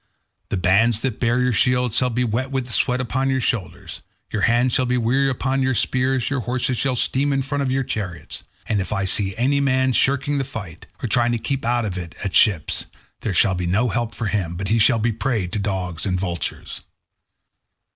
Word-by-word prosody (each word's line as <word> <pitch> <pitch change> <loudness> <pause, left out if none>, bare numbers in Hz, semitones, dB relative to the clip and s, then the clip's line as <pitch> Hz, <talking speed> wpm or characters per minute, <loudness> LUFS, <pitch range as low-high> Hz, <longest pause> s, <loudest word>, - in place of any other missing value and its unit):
The - - -1
bands 105 +5 +3
that 130 -5 -2
bear 120 +1 +2
your 125 -1 +2
shields 125 0 +2
shall 125 0 +3
be 125 +1 0
wet 125 +3 -1
with 135 -2 -2
the 120 - -7
sweat 125 +3 +1
upon 130 +2 -1
your 130 0 +1
shoulders, 115 -7 -3 0.3
your 110 - -1
hands 120 +3 +3
shall 130 - +2
weary 125 +3 +2
upon 135 +1 -1
your 130 0 +1
spears, 130 +1 0
your 140 -2 -1
horses 125 +1 -1
shall 135 -2 +1
steam 140 +4 +1
in 135 -1 +1
front 140 +2 -2
of 135 - 0
your 135 +1 +1
chariots, 100 -8 -5 0.3
and 105 -3 +1
if 95 - -5
I 100 -2 0
see 95 0 0
any 135 +4 +2
man 130 -2 +2
shirking 140 +3 +1
the - - 0
fight, 110 - -8 0.2
or - - 0
trying 120 +2 +2
to - - +1
keep 135 +4 -3
out 120 0 +1
of 95 -3 -3
it 85 -2 -8
at 100 - -2
the - - -5
ships, 95 -8 +3 0.3
there 105 -4 -3
shall 95 +2 +4
be 90 -1 -2
no 110 +7 +2
help 115 +2 -2
for 115 - -3
him, 95 -5 -1
but 95 +2 -4
he 115 +1 +3
shall 115 +2 +4
be 115 +2 +1
a - - -4
prey 115 -3 -1
to 90 +4 -3
dogs 95 -3 -3
and 90 -1 0
vultures." 85 -3 -4
120 Hz, 225 wpm, -22 LUFS, 100-130 Hz, 0.3 s, shall